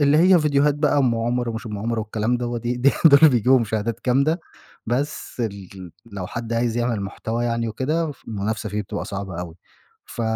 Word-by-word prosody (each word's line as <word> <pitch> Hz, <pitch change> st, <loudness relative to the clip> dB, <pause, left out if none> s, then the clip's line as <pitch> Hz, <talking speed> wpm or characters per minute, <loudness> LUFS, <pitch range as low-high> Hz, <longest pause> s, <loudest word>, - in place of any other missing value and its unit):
اللي 145 Hz, +1 st, +4 dB
هي 185 Hz, +1 st, +6 dB
فيديوهات 150 Hz, -1 st, +2 dB
بقى 145 Hz, -1 st, +2 dB
أم 125 Hz, -4 st, +2 dB
عمر 120 Hz, +1 st, -1 dB
ومش 115 Hz, +1 st, -5 dB
أم 105 Hz, -2 st, -5 dB
عمر 115 Hz, +2 st, -2 dB
والكلام 110 Hz, +3 st, -1 dB
دوّة، 120 Hz, -1 st, -3 dB
دي 120 Hz, +2 st, -2 dB
دي 130 Hz, +3 st, +4 dB
دول 140 Hz, -3 st, +9 dB
اللي 155 Hz, -1 st, +7 dB
بيجيبوا 125 Hz, +2 st, +4 dB
مشاهدات 110 Hz, 0 st, -2 dB
جامدة، 140 Hz, +7 st, +2 dB, 0.5 s
بس 130 Hz, +1 st, -3 dB
ال 100 Hz, -4 st, -6 dB, 0.2 s
لو 95 Hz, -2 st, -5 dB
حد 115 Hz, +3 st, -5 dB
عايز 115 Hz, 0 st, 0 dB
يعمل 120 Hz, -3 st, 0 dB
محتوى 110 Hz, +4 st, -3 dB
يعني 115 Hz, -1 st, -1 dB
وكده 150 Hz, +7 st, -1 dB
فالمنافسة 110 Hz, -2 st, -4 dB
فيه 105 Hz, +1 st, -2 dB
بتبقى 100 Hz, -, -5 dB
صعبة 95 Hz, -3 st, -5 dB
أوي، 85 Hz, -2 st, -7 dB, 0.5 s
ف 120 Hz, -, -6 dB
120 Hz, 190 wpm, -22 LUFS, 110-135 Hz, 0.5 s, دول